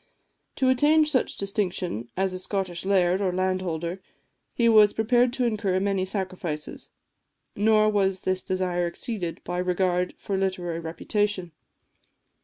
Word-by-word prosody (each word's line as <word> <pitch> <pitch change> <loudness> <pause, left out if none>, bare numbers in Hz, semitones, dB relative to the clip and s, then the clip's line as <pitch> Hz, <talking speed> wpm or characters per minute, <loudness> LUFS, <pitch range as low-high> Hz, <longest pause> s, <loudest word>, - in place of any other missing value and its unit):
To 260 - +1
attain 295 +4 +4
such 300 -4 0
distinction 185 - -2
as 190 0 0
a 185 - -4
Scottish 185 -2 -3
laird, 190 -1 +2
or 190 -2 +1
landholder, 185 -1 -2 0.5
he 235 - +1
was 215 -2 +6
prepared 240 +2 +3
to 255 -1 0
incur 205 -5 0
many 195 -1 0
sacrifices; 185 -6 -5 0.7
nor 215 +1 +4
was 195 -3 +1
this 185 0 -1
desire 180 -2 -1
exceeded 175 -2 -4
by 175 +1 -3
regard 180 0 0
for 200 - -3
literary 180 -3 -2
reputation. 185 +3 -2
190 Hz, 130 wpm, -26 LUFS, 180-210 Hz, 0.7 s, was